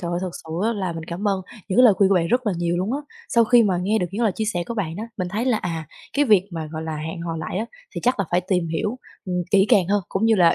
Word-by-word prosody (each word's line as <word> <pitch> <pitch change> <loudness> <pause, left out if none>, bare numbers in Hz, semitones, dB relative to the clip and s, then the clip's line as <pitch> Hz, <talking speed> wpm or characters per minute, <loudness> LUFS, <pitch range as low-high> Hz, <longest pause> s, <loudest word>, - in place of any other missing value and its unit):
trời 170 - -3
ơi 175 - -1
thật 185 - -2
sự 160 - -10
á 230 - +2
là 190 -5 -2
mình 165 -1 -6
cảm 180 +5 -2
ơn 195 -1 0 0.3
những 190 - 0
cái 255 - +8
lời 220 -5 +7
khuyên 190 0 +4
của 195 - +3
bạn 170 -2 +2
rất 245 +5 +1
là 210 - +2
nhiều 170 0 0
luôn 190 +6 -1
á. 280 - 0 0.3
Sau 235 -1 +4
khi 235 +1 +6
mà 190 -4 +1
nghe 215 +4 +2
được 180 - 0
những 210 +5 -2
lời 220 -4 +3
chia 220 - -2
sẻ 180 -5 -1
của 235 - -4
bạn 170 -6 -3
á, 215 - -4
mình 185 -4 -2
thấy 210 +6 -2
là, 250 -4 +2
à, 165 -3 -4 0.3
cái 290 +1 +3
việc 205 -5 +4
mà, 165 -3 -4
gọi 160 0 -4
là, 160 -1 -4
hẹn 160 +3 -5
hò 165 -1 -3
lại 160 +3 -3
á 220 - -1 0.3
thì - - -3
chắc 250 -1 +2
là 200 - +1
phải 175 - +3
tìm 180 -3 +1
hiểu, 210 +9 -2 0.3
ừm, 180 -1 -2
kỹ 195 0 +5
càng 205 -8 +5
hơn 205 0 +2
cũng 195 +4 -1
như 225 - +5
là 175 -5 +5
190 Hz, 330 wpm, -23 LUFS, 170-220 Hz, 0.3 s, cái